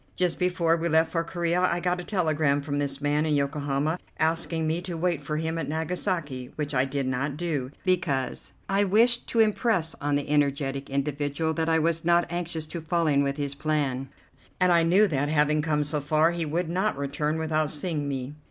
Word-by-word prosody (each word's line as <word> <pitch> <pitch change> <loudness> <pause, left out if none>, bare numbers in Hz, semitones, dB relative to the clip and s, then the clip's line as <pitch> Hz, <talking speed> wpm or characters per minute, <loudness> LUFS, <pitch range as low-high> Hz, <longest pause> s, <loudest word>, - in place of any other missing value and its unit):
Just 180 -2 0
before 175 -2 +2
we 170 0 -1
left 160 0 +3
for 165 -1 0
Corea 170 +1 -1
I 180 -1 +2
got 180 +1 0
a - - -8
telegram 155 -7 +1
from 145 -1 -2
this 140 -1 -3
man 145 +1 +1
in 155 -2 +1
Yokohama, 145 +3 -1 0.2
asking 160 0 0
me 160 +2 0
to 175 -2 -5
wait 170 -2 0
for 150 +2 -3
him 160 +1 -2
at 165 - -3
Nagasaki, 160 -5 -3
which 150 -1 -3
I 130 0 +2
did 135 0 -2
not 135 +3 -2
do, 150 -7 -2 0.2
because 170 -8 0
I 195 +1 +2
wished 230 +5 +3
to 230 - 0
impress 215 -6 +1
on 145 0 +1
the 145 +1 -1
energetic 140 -2 0
individual 145 +3 -1
that 160 0 -1
I 160 - +4
was 165 0 +1
not 170 0 +3
anxious 170 -2 -2
to 165 +2 -6
fall 165 +1 0
in 145 -2 +3
with 140 0 -1
his 140 -1 -2
plan, 140 -3 -1 0.5
and 180 -1 +4
I 170 -1 +5
knew 185 +6 +4
that, 145 -4 -1
having 150 0 +2
come 150 -1 +1
so 150 +1 -2
far, 155 +3 +3
he 170 -2 -3
would 165 +3 -1
not 185 +2 0
return 145 +2 -1
without 155 -1 0
seeing 150 -1 -3
me. 135 0 -4
155 Hz, 205 wpm, -26 LUFS, 145-170 Hz, 0.5 s, I